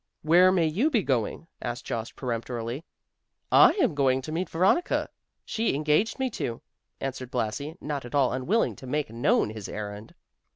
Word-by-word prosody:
"Where 175 Hz, +4 st, +6 dB
may 175 Hz, -3 st, +3 dB
you 195 Hz, -, +2 dB
be 230 Hz, -9 st, +1 dB
going?" 130 Hz, +2 st, -1 dB, 0.2 s
asked 120 Hz, 0 st, -4 dB
Jost 115 Hz, 0 st, -4 dB
peremptorily. 120 Hz, +2 st, -4 dB, 0.7 s
"I -, -, +8 dB
am 365 Hz, -, +1 dB
going 135 Hz, -2 st, +2 dB
to 155 Hz, -, -6 dB
meet 175 Hz, +4 st, -2 dB
Veronica; 190 Hz, -, +2 dB, 0.4 s
she 225 Hz, -8 st, 0 dB
engaged 155 Hz, +9 st, +1 dB
me 260 Hz, -2 st, -1 dB
to," 115 Hz, -, -4 dB, 0.4 s
answered 130 Hz, -2 st, -4 dB
Blasi, 130 Hz, +6 st, -3 dB
not 145 Hz, -2 st, -4 dB
at 120 Hz, +3 st, -7 dB
all 135 Hz, -3 st, +3 dB
unwilling 160 Hz, -, +1 dB
to 130 Hz, -, -10 dB
make 145 Hz, -2 st, -1 dB
known 130 Hz, -, +2 dB
his 110 Hz, -2 st, -7 dB
errand. 105 Hz, +1 st, -7 dB
140 Hz, 165 wpm, -27 LUFS, 120-175 Hz, 0.7 s, I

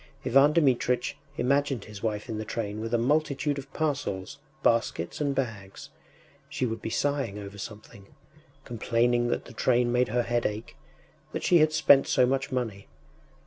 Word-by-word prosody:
Ivan 135 Hz, +4 st, +5 dB
Dmitritch 125 Hz, -5 st, +2 dB, 0.2 s
imagined 135 Hz, -2 st, +1 dB
his 105 Hz, -2 st, -10 dB
wife 105 Hz, -2 st, -2 dB
in 110 Hz, -, -4 dB
the -, -, -3 dB
train 105 Hz, -1 st, -4 dB
with 115 Hz, 0 st, -4 dB
a 120 Hz, -, +3 dB
multitude 145 Hz, +2 st, 0 dB
of 135 Hz, 0 st, -11 dB
parcels, 135 Hz, -12 st, -3 dB, 0.2 s
baskets, 115 Hz, -, 0 dB
and 140 Hz, -2 st, 0 dB
bags; 110 Hz, -7 st, -5 dB, 0.6 s
she 130 Hz, -, -2 dB
would 115 Hz, -2 st, -3 dB
be -, -, -4 dB
sighing 135 Hz, -3 st, -1 dB
over 100 Hz, 0 st, -8 dB
something, 105 Hz, -2 st, -10 dB, 0.6 s
complaining 120 Hz, +1 st, +1 dB
that -, -, -2 dB
the -, -, -12 dB
train 120 Hz, +1 st, +2 dB
made 125 Hz, +1 st, +2 dB
her 120 Hz, +2 st, 0 dB
head 120 Hz, 0 st, 0 dB
ache, 105 Hz, +2 st, -7 dB, 0.6 s
that -, -, -3 dB
she 175 Hz, -, +5 dB
had 155 Hz, 0 st, +4 dB
spent 155 Hz, -3 st, +5 dB
so 125 Hz, -, +4 dB
much 135 Hz, +3 st, -1 dB
money.... 115 Hz, -6 st, -3 dB
120 Hz, 165 wpm, -27 LUFS, 110-135 Hz, 0.6 s, Ivan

